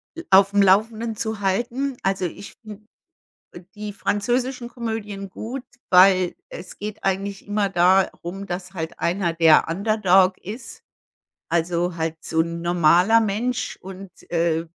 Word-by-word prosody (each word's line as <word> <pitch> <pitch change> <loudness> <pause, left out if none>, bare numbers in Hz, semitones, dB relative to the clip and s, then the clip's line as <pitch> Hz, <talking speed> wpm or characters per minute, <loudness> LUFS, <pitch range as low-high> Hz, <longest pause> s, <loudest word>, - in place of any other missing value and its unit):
l 335 +1 -8
aufm 200 +1 +5
Laufenden 220 +4 +2
zu 220 -1 -4
halten. 240 +8 -1
Also 195 -1 -1
ich 180 +3 -8
finde 210 -1 -10 0.9
die 210 -1 -6
französischen 245 +5 -1
Komödien 220 -5 -5
gut, 245 +7 -7 0.3
weil 185 -1 +5
es 180 +1 -10
geht 210 +1 -7
eigentlich 195 +1 -3
immer 205 -1 0
darum, 185 +1 +1
dass 180 0 -6
halt 165 -1 -6
einer 175 0 0
der 165 -2 +5
Underdog 190 0 +2
ist. 215 +7 -9 0.6
Also 170 +1 0
halt 160 0 -2
so 160 - 0
'n 170 +1 -2
normaler 175 +6 +4
Mensch 225 +4 -2
und, 190 0 -10 0.2
äh 165 -1 +1
195 Hz, 130 wpm, -22 LUFS, 175-215 Hz, 0.9 s, aufm